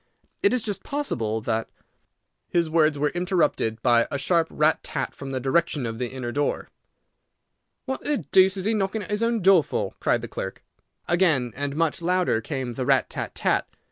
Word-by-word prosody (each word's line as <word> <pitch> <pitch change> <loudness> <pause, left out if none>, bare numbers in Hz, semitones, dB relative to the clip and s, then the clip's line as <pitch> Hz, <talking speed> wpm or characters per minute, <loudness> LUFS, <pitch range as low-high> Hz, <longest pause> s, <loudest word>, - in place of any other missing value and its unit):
"It 400 - +4
is 250 -3 0
just 205 -3 -2
possible 115 - -2
that—" 110 0 -2 0.8
His 170 -2 +1
words 155 -2 +3
were 150 +1 +1
interrupted 175 - 0
by 115 -1 +4
a - - -2
sharp 165 +3 +2
rat 155 +1 +2
tat - - -4
from 140 - -8
the 130 -1 -2
direction 140 +1 +1
of 115 0 -4
the 125 - -1
inner 130 -2 -4
door. 145 +3 -1 1.2
"What 265 0 -4
the 295 -1 +2
deuce 190 -3 +3
is 190 - -3
he 220 - +2
knocking 205 0 -1
at 205 - -9
his 210 +1 0
own 230 -3 +1
door 190 -4 +6
for?" - - -3
cried - - +1
the - - -4
clerk. - - -6 0.4
Again 160 - +2
and 140 0 -3
much 165 +2 0
louder 180 -9 +1
came 125 +1 -4
the 130 +2 -3
rat 135 -2 +3
tat - - -5
tat. - - +1
160 Hz, 190 wpm, -25 LUFS, 130-190 Hz, 1.2 s, door